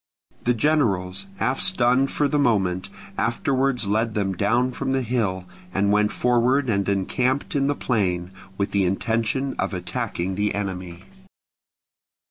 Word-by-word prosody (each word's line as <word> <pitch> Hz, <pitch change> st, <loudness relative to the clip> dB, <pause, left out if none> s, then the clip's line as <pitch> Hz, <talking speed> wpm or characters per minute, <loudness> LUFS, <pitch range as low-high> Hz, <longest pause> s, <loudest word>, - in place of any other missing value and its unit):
The 120 Hz, 0 st, +3 dB
generals, 100 Hz, -9 st, +1 dB
half 130 Hz, +6 st, 0 dB
stunned 130 Hz, -5 st, +2 dB
for 145 Hz, -, +1 dB
the 150 Hz, +1 st, +1 dB
moment, 95 Hz, -8 st, +1 dB, 0.3 s
afterwards 130 Hz, +1 st, +1 dB
led 110 Hz, +2 st, 0 dB
them 100 Hz, -2 st, 0 dB
down 120 Hz, +7 st, +1 dB
from 135 Hz, +1 st, -2 dB
the 135 Hz, -1 st, +1 dB
hill, 105 Hz, -7 st, -1 dB, 0.3 s
and 100 Hz, +1 st, +2 dB
went 105 Hz, 0 st, +3 dB
forward 125 Hz, +3 st, +2 dB
and 100 Hz, -2 st, +1 dB
encamped 125 Hz, +9 st, 0 dB
in 140 Hz, -1 st, +2 dB
the 145 Hz, -, +1 dB
plain, 90 Hz, -9 st, -1 dB, 0.3 s
with 100 Hz, 0 st, -1 dB
the 100 Hz, -1 st, +2 dB
intention 115 Hz, +7 st, 0 dB
of -, -, -1 dB
attacking 90 Hz, 0 st, -3 dB
the 105 Hz, +2 st, 0 dB
enemy. 95 Hz, -3 st, -5 dB
110 Hz, 140 wpm, -23 LUFS, 95-130 Hz, 0.3 s, The